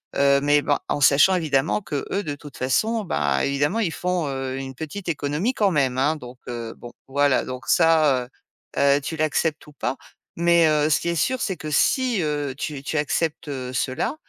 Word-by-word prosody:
heu, 140 0 +4
mais 145 0 +3
ben, 145 - +1
en 145 - -2
sachant 145 +7 +5
évidemment 155 +2 +1
qu'eux 190 +5 -3
de 145 -1 -4
toute 145 -1 -13
façon, 215 - 0
ben, 70 - 0
évidemment 145 +10 0
ils 185 -7 0
font, 180 -3 -1
heu, 135 -1 -3
une 135 0 -6
petite 160 +7 -6
économie 155 - -1
quand 210 -5 +2
même, 135 -5 +1
hein, 145 +4 +2
donc, 125 -4 -11
heu, 115 -2 -5
bon, 120 - -11 0.2
voilà 140 0 +2
donc 130 0 -7
ça, 155 -6 +4
heu - - -30 0.5
heu, 140 0 +4
tu 160 +3 -5
l'acceptes 155 0 0
ou 150 - -14
pas, 135 - -3 0.4
mais, 170 0 +4
heu, 150 0 +2
ce 155 - +3
qui 170 - -2
est 170 - -1
sûr, 260 - 0
c'est 190 -3 -2
que 155 +1 -6
si, 245 - +2
heu, 145 -3 -2
tu 145 -1 -4
tu 155 - -3
acceptes, 150 +2 -1
heu, 130 -2 -5
cela, 130 - -1
145 Hz, 200 wpm, -23 LUFS, 135-165 Hz, 0.5 s, sachant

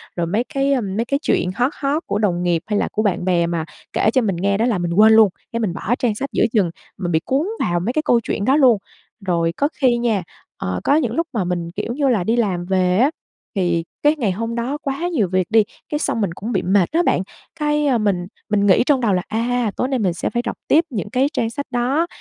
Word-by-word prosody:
rồi 170 -1 -1
mấy 210 +7 0
cái, 275 0 +2
ờ, 260 - +1
mấy 205 +2 -2
cái 280 +3 0
chuyện - - +1
hot 250 +3 +1
hot 290 +4 0
của 205 - -1
đồng 180 -5 0
nghiệp 175 -2 +1
hay 210 -1 0
là - - 0
của 215 - -1
bạn 190 -4 0
bè 175 -2 +2
mà 170 -2 -2 0.3
kể - - +2
cho 260 - +4
mình 200 -5 0
nghe 195 +3 0
đó 225 - +1
là 235 -5 +1
mình 175 -1 -2
quên 215 +4 +6
luôn, 220 -2 +7 0.2
cái 230 - -1
mình 200 -6 -1
bỏ 220 +6 -1
trang 230 -4 +1
sách 275 +6 -4
giữa - - +3
chừng, 195 -7 +2 0.3
mình 175 -2 -3
bị 160 - +3
cuốn 280 +7 0
vào 175 0 0
mấy 225 +8 -1
cái 310 - +1
câu 240 - +4
chuyện 200 - -2
đó 265 - +4
luôn. 255 -7 +5 0.5
Rồi 170 -2 +1
có 285 - +1
khi 250 -3 +4
nha, 225 -5 0 0.3
ờ, 90 0 -3
có 285 - +3
những 255 -7 +1
lúc 330 +5 -1
mà 215 -5 0
mình, 175 -1 -3
kiểu 210 +5 -4
như 280 +1 0
là, 215 -8 +2
đi 225 +6 +1
làm 190 -7 0
về 185 -1 +1
á 265 +7 +4 0.4
thì 175 -3 +1 0.2
cái 295 +1 +4
ngày 235 -10 0
hôm 230 +5 -3
đó 245 +5 -2
quá 280 +5 -2
nhiều 260 - +1
việc 185 -1 0
đi, 220 0 +5 0.3
cái 295 - -1
xong 230 - -1
mình 190 -5 -1
cũng 215 +7 -5
bị - - +1
mệt 190 -1 +2
á 335 +3 +2
bạn, 185 - +2 0.4
cái, 295 0 +1
à, 265 -4 +3
mình 195 -5 0 0.2
mình 205 -1 +2
nghĩ 190 +2 +5
trong 275 -2 +2
đầu 220 -5 +2
là, 180 - +1
à, 235 0 0
tối 250 - -1
nay 265 -1 -1
mình 190 -5 +1
sẽ 175 - -2
phải 240 - -1
đọc 235 - -3
tiếp 320 +3 +4
những 210 -6 -4
cái 255 +5 +2
trang 225 - 0
sách 285 +4 -5
đó 260 +7 +1
220 Hz, 270 wpm, -20 LUFS, 185-255 Hz, 0.5 s, luôn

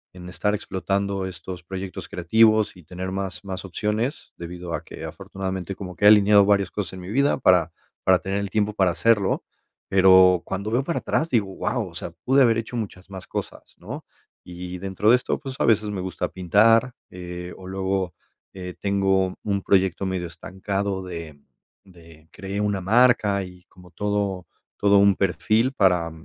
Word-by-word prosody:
en 90 -1 -9
estar 105 +3 -1
explotando 100 0 -2
estos 90 0 -8
proyectos 95 0 -6
creativos 110 +5 +3
y 90 - -15
tener 90 +3 -6
más 95 -2 -4
más 95 -1 -6
opciones, 105 - -3
debido 85 0 -7
a - - -6
que 80 - -9
afortunadamente 95 +2 -5
como 90 -2 -8
que 95 - -1
he - - +9
alineado 105 -1 +6
varias 100 -2 +2
cosas 100 -4 -4
en 95 - -8
mi 90 - -9
vida 140 +5 +2
para 90 -7 +4 0.3
para 95 -1 +4
tener 95 +4 -2
el 100 -1 -3
tiempo 105 0 0
para 95 -3 +2
hacerlo, 105 +2 +2 0.5
pero 95 -2 +6
cuando 100 +2 -4
veo 125 +4 +1
para 170 +4 -2
atrás, 160 - -1
digo: 110 -5 +2
"Wao", - - -2
o - - -17
sea, - - -6
pude 135 +2 +4
haber 115 -2 +3
hecho 115 +2 -6
muchas 100 -4 -6
más 95 -2 -8
cosas, - - -7
¿no? - - -8 0.4
Y 90 +1 -7
dentro 95 +2 0
de 120 - +8
esto, 125 - -2
pues, 135 -3 -7
a - - +2
veces 110 -2 +3
me 100 -2 -4
gusta 95 0 -3
pintar, 110 +7 +3 0.2
eh, 90 0 -8
o 95 - -12
luego, 95 -2 -2 0.4
eh, 90 -1 -7
tengo 95 -2 +1
un 100 -2 -1
proyecto 95 -1 +2
medio 95 -2 -2
estancado 95 +3 -4
de 85 -5 -8 0.5
de 85 -4 -18
cree 100 +1 -5
una 100 -2 -1
marca 105 -1 +3
y 90 -1 -12
como 90 -1 -17
todo 100 -1 -2 0.3
todo 100 0 +4
un 100 -1 +5
perfil 110 +6 +1
para 90 -7 +2
95 Hz, 180 wpm, -24 LUFS, 90-105 Hz, 0.5 s, he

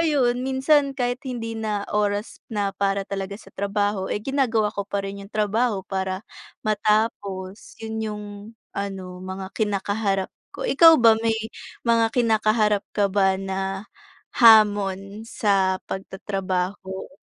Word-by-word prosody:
ayun, 275 -7 +2
minsan 275 +1 +2
kahit 245 -1 -1
hindi 230 -3 -4
na 210 -2 -2
oras 205 0 -1
na 205 -3 -1
para 200 0 0
talaga 195 0 -4
sa 195 - -16
trabaho, 200 -1 -1
eh, 205 - -2
ginagawa 240 -5 +1
ko 200 -1 -5
pa 200 -1 -2
rin 195 0 -6
'yong 200 - -22
trabaho 215 0 +1
para 190 0 -3 0.4
matapos. 210 -2 -1
'Yon 220 0 -4
'yong 210 -1 -4 0.5
ano, 190 -2 -5
mga 190 +1 -6
kina-kaharap 200 -2 0 0.2
ko. - - -6
Ikaw 330 - +8
ba 225 -1 +7
may 225 -1 +1 0.5
mga 230 -1 +3
kina-kaharap 215 -3 +2
ka 200 -1 +2
ba 190 -1 +3
na 195 +1 -3 0.5
hamon 205 -2 +5
sa 195 -4 +1
pag-tatrabaho? 190 0 -4
205 Hz, 130 wpm, -24 LUFS, 195-225 Hz, 0.5 s, Ikaw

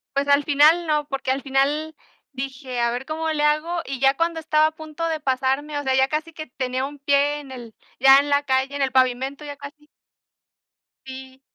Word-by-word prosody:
Pues 280 +1 0
al 285 0 +4
final 310 +4 +4
no 300 -1 0
porque 270 -2 -3
al 270 +1 -1
final 290 +3 -1 0.4
dije, 260 -1 -6
a 235 0 +1
ver 250 +2 -4
cómo 320 +1 -3
le 300 -1 -1
hago, 310 +3 +1
y 270 -2 -5
ya 270 0 +3
cuando 335 0 -1
estaba 310 0 +2
a - - -4
punto 315 +1 -6
de 320 -1 -2
pasarme, 270 +2 -1
o - - -5
sea, 265 -1 +1
ya 265 0 +3
casi 310 +2 -3
que 310 -2 -8
tenía 255 +1 -3
un 290 0 -9
pie 285 +1 +1
en 275 -2 -12
el 240 -4 -10 0.3
ya 270 +1 +7
en 290 +1 -2
la 285 0 +2
calle, 265 +1 0
en 285 - -3
el 265 -1 +1
pavimento, 260 +3 0
ya 285 -1 -7
casi 295 +1 -12 1.2
Sí, 265 0 -10
285 Hz, 215 wpm, -22 LUFS, 265-305 Hz, 1.2 s, ya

